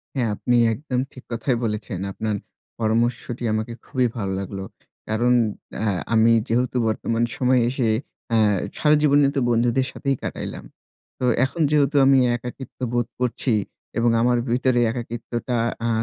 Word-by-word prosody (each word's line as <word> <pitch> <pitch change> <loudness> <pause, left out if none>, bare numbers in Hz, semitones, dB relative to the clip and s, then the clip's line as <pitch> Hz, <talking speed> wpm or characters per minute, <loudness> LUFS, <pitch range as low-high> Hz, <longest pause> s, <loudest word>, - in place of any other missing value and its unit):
হ্যাঁ, 120 -4 +1
আপনি 120 +3 +1 0.2
একদম 130 -1 -3
ঠিক 130 - -13
কথাই 120 +2 0
বলেছেন। 105 -4 -3
আপনার 110 +1 -2 0.4
পরামর্শটি 120 +2 0
আমাকে 110 +2 -2
খুবই 130 -3 +1
ভালো 100 -3 -2
লাগলো। 95 0 -5 0.5
কারণ 120 +3 +2 0.5
অ্যা - - -2 0.3
আমি 115 +1 +5 0.2
যেহেতু 125 +2 0
বর্তমান 115 +1 0
সময়ে 125 -1 +3
এসে 125 -2 0 0.4
অ্যা 115 - +3 0.4
সারা 150 0 +4
জীবনই 145 -1 +4
তো - - +2
বন্ধুদের 120 +2 +2
সাথেই 140 -1 -1
কাটাইলাম। - - -5 0.5
তো 130 - 0 0.2
এখন 140 +5 -4
যেহেতু 145 -1 +3
আমি 135 0 +6 0.2
একাকিত্ব 125 +2 -8
বোধ 120 -1 +1
করছি 125 0 0 0.4
এবং 120 +1 +3
আমার 120 +1 +3
ভিতরে 125 0 +2
একাকিত্বটা 120 +1 -4 0.3
আ - - +1
120 Hz, 140 wpm, -23 LUFS, 115-130 Hz, 0.5 s, আমি